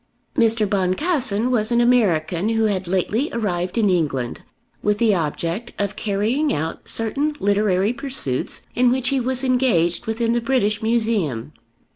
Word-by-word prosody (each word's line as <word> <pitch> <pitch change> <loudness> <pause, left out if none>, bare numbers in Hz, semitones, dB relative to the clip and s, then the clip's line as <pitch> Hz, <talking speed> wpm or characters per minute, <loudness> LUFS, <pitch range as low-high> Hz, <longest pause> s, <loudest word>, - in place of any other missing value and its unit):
Mr. 225 -2 +2
Boncassen 215 - 0
was 225 -2 +1
an 235 - +3
American 200 -7 +2
who 225 0 +1
had 195 -4 0
lately 200 - 0
arrived 185 -4 -2
in 220 -3 +3
England 145 -9 -1 0.4
with 210 0 +1
the 220 -1 +3
object 170 +6 -2
of 200 0 -2
carrying 220 +9 0
out 160 +2 -4
certain 280 +7 -1
literary 200 +1 +1
pursuits 250 - -2
in 250 0 +3
which 255 0 +1
he 275 - +1
was 255 +1 0
engaged 240 -8 +1
within 230 +1 0
the 235 0 +1
British 230 -4 0
Museum. 215 - 0
215 Hz, 145 wpm, -21 LUFS, 185-240 Hz, 0.4 s, an